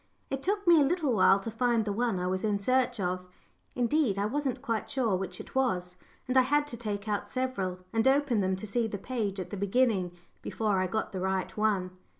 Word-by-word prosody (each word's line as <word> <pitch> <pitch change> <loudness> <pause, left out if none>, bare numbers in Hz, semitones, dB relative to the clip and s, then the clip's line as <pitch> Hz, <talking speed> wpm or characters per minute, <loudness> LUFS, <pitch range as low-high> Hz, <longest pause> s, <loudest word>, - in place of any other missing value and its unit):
It 270 0 -2
took 405 +5 -1
me 340 -3 +7
a - - +6
little 300 -2 +1
while 195 -1 +5
to 225 - -5
find 230 -1 +1
the 205 - -1
one 230 -3 0
I 180 - -2
was 185 +1 -1
in 210 -2 +1
search 250 +3 +1
of; 180 0 -2 0.5
indeed, 250 -3 +1
I 200 - 0
wasn't 270 +3 -2
quite 225 -2 -2
sure 250 -8 +1
which 185 -1 -4
it - - -10
was, 180 -9 0 0.3
and 255 - -1
I 260 - +8
had 290 +3 +2
to 240 - -5
take 210 -3 -4
out 205 -1 -1
several, 255 -9 -2 0.2
and 225 +2 +2
open 270 -4 +3
them 190 0 +1
to 190 - -7
see 225 +2 0
the 205 - -4
page 210 -3 -3
at 185 - -6
the 205 - -4
beginning 200 -3 +1 0.3
before 210 -4 0
I 185 - +1
got 220 +4 -2
the 190 - -4
right 190 0 -1
one. 205 -4 +1
220 Hz, 225 wpm, -29 LUFS, 190-255 Hz, 0.5 s, I